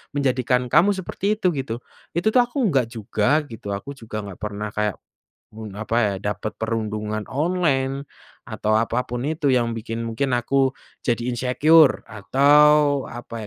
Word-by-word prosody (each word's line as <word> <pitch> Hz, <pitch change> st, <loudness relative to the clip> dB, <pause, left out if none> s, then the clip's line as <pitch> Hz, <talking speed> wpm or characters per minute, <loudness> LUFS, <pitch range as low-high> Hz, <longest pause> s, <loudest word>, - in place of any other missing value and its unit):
menjadikan 125 Hz, -2 st, +1 dB
kamu 190 Hz, +5 st, +5 dB
seperti 195 Hz, +2 st, -2 dB
itu 185 Hz, -, +2 dB
gitu, 130 Hz, -4 st, -3 dB, 0.4 s
itu 175 Hz, +5 st, 0 dB
tuh 250 Hz, -, +6 dB
aku 245 Hz, -, -9 dB
enggak 135 Hz, -, +2 dB
juga 115 Hz, +6 st, 0 dB
gitu 110 Hz, -3 st, -8 dB
aku 100 Hz, +8 st, -7 dB
juga 110 Hz, -2 st, -6 dB
nggak 100 Hz, -3 st, -9 dB
pernah 105 Hz, 0 st, -4 dB
kayak, 105 Hz, -2 st, -1 dB, 0.6 s
mmm, 110 Hz, -3 st, -8 dB
apa 110 Hz, +1 st, -2 dB
ya? 100 Hz, -, 0 dB, 0.2 s
Dapet 110 Hz, +1 st, -6 dB
perundungan 110 Hz, -1 st, -2 dB
online, 140 Hz, -3 st, 0 dB, 0.4 s
atau 110 Hz, 0 st, -1 dB
apa 115 Hz, +2 st, +1 dB
pun 120 Hz, 0 st, -3 dB
itu 150 Hz, -2 st, -1 dB
yang 120 Hz, -2 st, +1 dB
bikin 115 Hz, +1 st, -4 dB
mungkin 115 Hz, +4 st, -2 dB
aku 135 Hz, +2 st, +1 dB, 0.3 s
jadi 120 Hz, -1 st, +1 dB
insecure 140 Hz, +6 st, +4 dB
atau 145 Hz, +5 st, +4 dB
apa 120 Hz, -1 st, -9 dB
125 Hz, 150 wpm, -22 LUFS, 110-145 Hz, 0.6 s, tuh